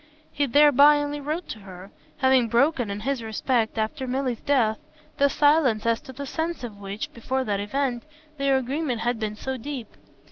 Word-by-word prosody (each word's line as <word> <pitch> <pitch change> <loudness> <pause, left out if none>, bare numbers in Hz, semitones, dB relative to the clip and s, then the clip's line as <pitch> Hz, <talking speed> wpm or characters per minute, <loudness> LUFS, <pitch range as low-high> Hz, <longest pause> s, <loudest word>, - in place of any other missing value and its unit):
He 285 -1 0
thereby 290 +2 +6
only 290 0 -2
wrote 310 +5 -3
to 215 - -6
her, 190 -1 -11 0.3
having 260 -4 +3
broken, 245 0 +2
in 200 +1 -5
this 275 -3 -1
respect, 225 +1 -1
after 255 +5 -2
Milly's 255 -2 -2
death, 230 -6 +2 0.4
the 280 0 +4
silence 290 -7 +3
as 230 0 +1
to - - -11
the 280 +2 -7
sense 320 +1 -3
of 215 -4 -7
which, 200 +2 -6
before 260 +3 -2
that 205 -4 -1
event, 245 +3 -1 0.4
their 275 -1 +3
agreement 265 -1 -2
had 240 -1 -1
been 215 -1 -3
so 265 +4 -4
deep. 255 -2 -7
260 Hz, 180 wpm, -25 LUFS, 220-280 Hz, 0.4 s, thereby